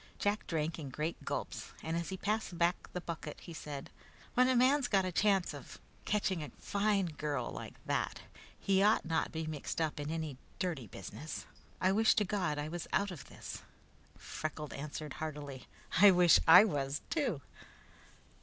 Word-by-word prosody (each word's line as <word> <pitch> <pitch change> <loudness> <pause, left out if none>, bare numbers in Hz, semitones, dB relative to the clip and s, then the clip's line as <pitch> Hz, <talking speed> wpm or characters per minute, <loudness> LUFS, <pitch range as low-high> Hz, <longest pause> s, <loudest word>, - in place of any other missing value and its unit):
Jack 205 +1 0
drank 160 0 -1
in 145 -4 -5
great 150 +5 -3
gulps, - - -4
and 160 +1 -2
as 170 -1 -2
he 190 - -4
passed 210 -2 -1
back 170 +1 +1
the 180 - -3
bucket, 160 -3 -6
he 170 - -9
said: 145 -3 -7 0.4
"When 250 +1 +5
a 260 - +3
man's 260 +2 +4
got 195 -2 +3
a 185 - -1
chance 195 0 +2
of - - -10 0.3
catching 195 -5 +1
a 150 - -5
fine 200 -1 +1
girl 150 -3 -2
like - - -7
that, - - -1 0.4
he 195 -1 +3
ought 210 +2 +4
not 160 -1 0
be 160 -1 -3
mixed 155 0 -4
up 155 -2 0
in 145 +1 -3
any 160 -4 -3 0.2
dirty 160 - -2
business. 105 - -7 0.3
I 185 - +3
wish 220 +3 +4
to 210 - +3
God 180 -6 0
I 145 +1 -2
was 170 +1 -5
out 200 -1 +1
of 170 - -8
this!" - - -8 0.6
Freckles 155 -1 -5
answered 150 +1 -5
heartily: 145 -4 -5 0.3
"I 205 +1 +10
wish 180 -2 +7
I 180 +5 +11
was, 140 -6 -1
too!" 255 - 0
170 Hz, 175 wpm, -34 LUFS, 150-200 Hz, 0.6 s, I